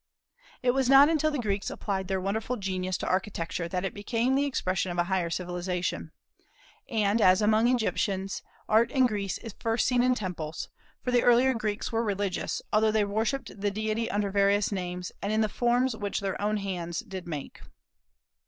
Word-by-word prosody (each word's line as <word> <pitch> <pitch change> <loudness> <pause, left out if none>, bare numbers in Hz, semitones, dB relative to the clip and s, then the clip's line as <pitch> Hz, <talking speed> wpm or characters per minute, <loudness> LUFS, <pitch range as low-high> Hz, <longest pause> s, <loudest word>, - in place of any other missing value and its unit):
It 250 - +4
was 265 0 +1
not 275 +2 +8
until 310 -1 +2
the 295 - -2
Greeks 205 -5 -1
applied 190 -2 -3
their 190 0 0
wonderful 220 +6 -2
genius 185 -2 -2
to - - -5
architecture 180 -3 -2
that 180 +2 -2
it - - -3
became 230 +5 0
the 280 +1 +2
expression 185 -9 -1
of 175 - -5
a 175 - +3
higher 175 -1 0
civilization. 180 +1 -3 0.8
And, 220 -2 +1
as 185 -1 +6
among 215 +2 +3
Egyptians, 200 -5 0 0.3
Art 225 +2 +4
in 260 -1 +3
Greece 205 -5 -1
is 225 -4 -9
first 225 +1 +1
seen 250 -2 +3
in 250 0 +3
temples; 170 -7 -5 0.3
for 250 - -1
the 245 -1 +4
earlier 245 +2 +5
Greeks 215 -1 -3
were 225 0 +1
religious, 200 -3 -2
although 215 +1 +4
they 215 -1 +2
worshipped 220 +1 -2
the 205 - +2
deity 215 +2 -2
under 205 -1 -1
various 200 +1 +3
names, 180 -2 -4
and 200 - -2
in 215 +1 +2
the 215 - +3
forms 245 +2 +1
which 205 -2 -2
their 195 -1 -3
own 210 +1 +1
hands 180 -4 -3
did 185 -2 -8
make. 150 -5 -6
205 Hz, 185 wpm, -28 LUFS, 185-230 Hz, 0.8 s, not